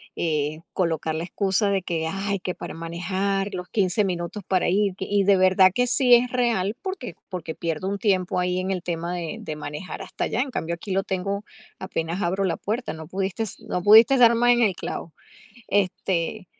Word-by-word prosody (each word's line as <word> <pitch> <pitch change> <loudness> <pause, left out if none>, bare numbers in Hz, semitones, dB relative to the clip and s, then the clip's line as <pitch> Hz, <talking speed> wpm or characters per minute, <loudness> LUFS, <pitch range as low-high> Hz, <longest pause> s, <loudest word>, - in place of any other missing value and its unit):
eh, 155 -1 -1
colocar 160 -3 -1
la 160 +2 -3
excusa 195 +2 0
de 195 -1 +1
que, 165 -3 -2
"Ay, 195 +2 -2
que 180 0 -4
para - - -7
manejar, 190 +4 -2
los 180 -1 -5
15 200 +1 +1
minutos 180 +2 -4
para 185 -2 +2
ir", 200 +1 +2
y 200 +1 0
de 200 0 +6
verdad 185 0 +5
que 245 - +3
sí 250 0 +4
es 245 +1 +2
real, 235 -4 0
porque 375 -10 -5
porque 180 -4 -5
pierdo 165 +3 -3
un 200 - -2
tiempo 185 -4 +1
ahí 180 0 0
en 190 +1 -2
el 185 -2 -2
tema 170 0 -3
de 170 -3 -4
de 155 - -5
manejar 150 +4 -6
hasta - - -5
allá, 220 - -1
en 270 0 -3
cambio 170 -7 -2
aquí 180 +4 -8
lo 195 +1 +1
tengo 200 +2 -2 0.4
apenas 170 0 -3
abro 190 +2 0
la 180 - 0
puerta, 230 +5 -3
no 160 -1 -9
pudiste 195 +3 -3
no 180 - -4
pudiste 225 +6 +7
dar 235 -1 +7
más 240 +1 +4
en 240 0 +3
el 210 -5 +3
clavo. 165 -2 -6 0.6
Este, 190 0 -1
190 Hz, 200 wpm, -24 LUFS, 175-205 Hz, 0.6 s, pudiste